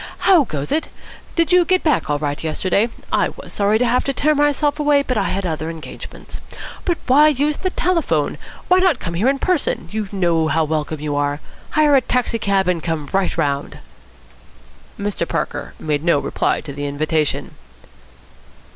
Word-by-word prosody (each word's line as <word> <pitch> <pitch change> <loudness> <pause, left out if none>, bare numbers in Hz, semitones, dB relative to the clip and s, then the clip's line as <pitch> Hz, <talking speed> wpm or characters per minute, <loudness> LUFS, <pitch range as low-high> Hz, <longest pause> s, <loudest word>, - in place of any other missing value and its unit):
How 350 -7 +6
goes 145 -7 -4
it? 315 - 0 0.5
Did 335 +1 +2
you 360 0 +6
get 370 +1 +1
back 305 - +1
all 145 - +1
right 145 0 -3
yesterday? 185 +7 0 0.2
I - - +2
was - - -10
sorry 205 +1 +2
to 245 - +1
have 245 +1 +2
to 275 - 0
tear 305 +4 +2
myself 290 0 +1
away, 290 -1 +3
but 255 - -2
I - - +1
had 195 0 -2
other 160 -1 -3
engagements. 165 -2 -9 0.4
But 345 -2 +1
why 285 +4 +6
use 295 0 +1
the 370 - -1
telephone? 360 -2 0 0.3
Why 365 +1 +5
not 370 -7 +3
come 170 - -5
here 205 +10 +2
in 275 - +1
person? 285 - 0
You 215 -2 -3
know 170 -5 +1
how 160 +1 +2
welcome 155 -1 -2
you 150 -1 -2
are. 145 0 0 0.4
Hire 300 -1 +5
a 270 - +5
taxi 245 -1 -1
cab 195 -2 +1
and 180 -2 +1
come 155 -3 -3
right 195 -1 0
round." 140 0 -1 1.2
Mr. 200 -4 -2
Parker 165 - -3
made 150 -1 -1
no 170 -3 +3
reply - - -1
to 145 -3 -8
the 145 +1 -4
invitation. 155 +1 -1
200 Hz, 180 wpm, -20 LUFS, -, 1.2 s, How